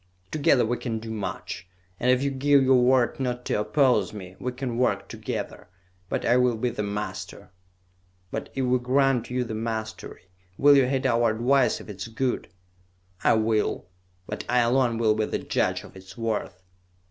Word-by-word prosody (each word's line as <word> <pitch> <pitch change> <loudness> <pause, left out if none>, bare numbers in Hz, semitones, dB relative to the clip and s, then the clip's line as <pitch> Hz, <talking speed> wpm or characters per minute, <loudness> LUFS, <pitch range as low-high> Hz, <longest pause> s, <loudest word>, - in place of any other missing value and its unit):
Together 140 -5 +3
we 120 +2 -1
can 115 -3 -3
do 110 0 -7
much, 95 -4 -5 0.3
and 125 - +1
if 130 +1 +3
you 140 - 0
give 140 +1 +3
your 130 -1 +5
word 125 0 +3
not 125 -2 -2
to - - 0
oppose 125 +4 +2
me, 95 -3 -9
we 125 - -3
can 125 -2 -4
work 125 - +1
together; - - -6 0.4
but - - -2
I 120 - +4
will 125 -2 +2
be 120 +2 -1
the 105 - -4
master!" 105 -2 -5 0.8
"But, - - -4
if 135 - 0
we 125 0 +2
grant 130 0 +1
you 125 0 0
the 115 -2 -6
mastery, 110 0 -5 0.3
will 145 +1 +6
you 135 -2 +5
heed 130 0 -1
our 115 0 +3
advice 120 +2 +2
if - - -12
it 105 -3 -8
is 95 - -5
good?" 125 +3 -2 0.8
"I - - +5
will, 110 -3 0 0.4
but - - -5
I 125 0 +4
alone 120 0 +2
will 110 -2 +3
be 110 0 0
the - - -2
judge 90 +1 -1
of 105 - -14
its 95 +3 -13
worth!" 110 -5 -3
120 Hz, 185 wpm, -26 LUFS, 110-130 Hz, 0.8 s, will